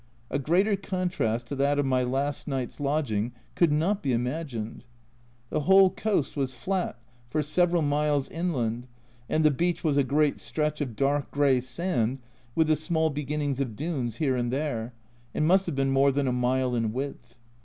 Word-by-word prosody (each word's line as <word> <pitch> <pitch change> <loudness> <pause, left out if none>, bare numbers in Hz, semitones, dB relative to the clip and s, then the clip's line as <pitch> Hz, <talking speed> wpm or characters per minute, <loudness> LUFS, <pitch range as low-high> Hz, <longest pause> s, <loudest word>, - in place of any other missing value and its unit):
A 140 - 0
greater 185 +9 +2
contrast 180 - -1
to 140 - -5
that 140 +1 +2
of 145 - +2
my 130 -1 +2
last 135 +3 -1
night's 135 -3 -3
lodging 135 -6 0 0.2
could 170 -3 +3
not 170 +7 +1
be 135 -3 0
imagined. 125 -2 -3 0.7
The 155 - +1
whole 190 +4 +6
coast 205 -9 -1
was 135 -3 -2
flat 185 +5 -2 0.3
for 150 +4 0
several 170 +2 +2
miles 145 -1 +1
inland, 125 -9 -2 0.4
and 155 - +2
the 155 - +6
beach 170 +5 0
was 150 -4 +2
a 140 - +5
great 145 +2 +1
stretch 150 -1 -2
of 125 -6 -3
dark 140 +2 +1
grey 140 -3 +3
sand 130 -2 -1 0.4
with 160 - +4
the 155 0 +3
small 160 0 0
beginnings 145 -1 -2
of 125 -6 -2
dunes 135 -6 -2
here 135 -3 +1
and 120 -1 -1
there, 125 -4 -2 0.4
and 155 - +1
must 185 +3 +4
have 165 - -2
been 135 0 +1
more 135 +1 +4
than 140 0 0
a 125 - +1
mile 125 +1 +1
in 115 -2 0
width. 125 -3 -6
140 Hz, 180 wpm, -27 LUFS, 125-155 Hz, 0.7 s, whole